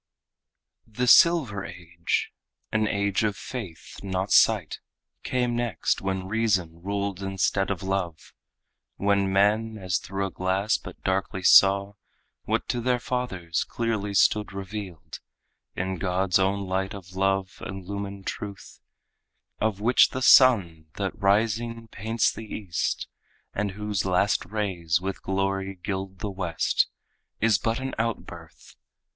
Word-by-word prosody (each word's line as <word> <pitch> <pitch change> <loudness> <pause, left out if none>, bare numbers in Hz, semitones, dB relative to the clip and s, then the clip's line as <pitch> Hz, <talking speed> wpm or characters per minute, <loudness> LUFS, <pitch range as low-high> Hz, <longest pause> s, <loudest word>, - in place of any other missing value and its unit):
The 115 +3 -2
silver 125 - +5
age 85 -1 -3 0.4
an 110 -1 +1
age 100 -1 0
of 105 -2 0
faith, 95 -11 -8
not 95 0 -3
sight 105 -9 +4 0.4
Came 125 -2 -1
next, 120 -8 -1
when 95 -1 -2
reason 95 -6 0
ruled 100 0 -3
instead 95 0 0
of 95 -3 -3
love; 95 -4 -3 0.6
When 100 -1 +1
men 105 +3 +2
as 95 -2 -1
through 100 0 -3
a 95 - -5
glass 95 +4 0
but - - -11
darkly 95 0 -1
saw 100 +2 +6 0.5
What - - -1
to 120 - -1
their 125 +1 +2
fathers 95 -10 -2
clearly 110 -4 -2
stood 105 +1 +3
revealed 95 -3 -7 0.6
In 95 0 -3
God's 95 0 +1
own 100 +1 +1
light 95 +1 -2
of 95 -1 -11
love 95 0 0
illumined 100 +1 -6
truth, 100 -1 -7 0.8
Of 110 -2 0
which 120 +3 +5
the 130 - -4
sun 95 - +5
that 100 -2 -2
rising 115 +3 0
paints 110 +3 0
the 110 -1 -9
east, 95 -6 -2 0.5
And 100 -1 -2
whose 105 -1 -2
last 95 +2 +1
rays 90 -6 -1
with 95 +1 -4
glory 95 0 -1
gild 95 +1 -5
the 105 - -3
west, 90 -4 0 0.5
Is 110 -3 +3
but 115 +3 -1
an 135 0 -4
outbirth. 115 0 -5
100 Hz, 130 wpm, -26 LUFS, 95-110 Hz, 0.8 s, saw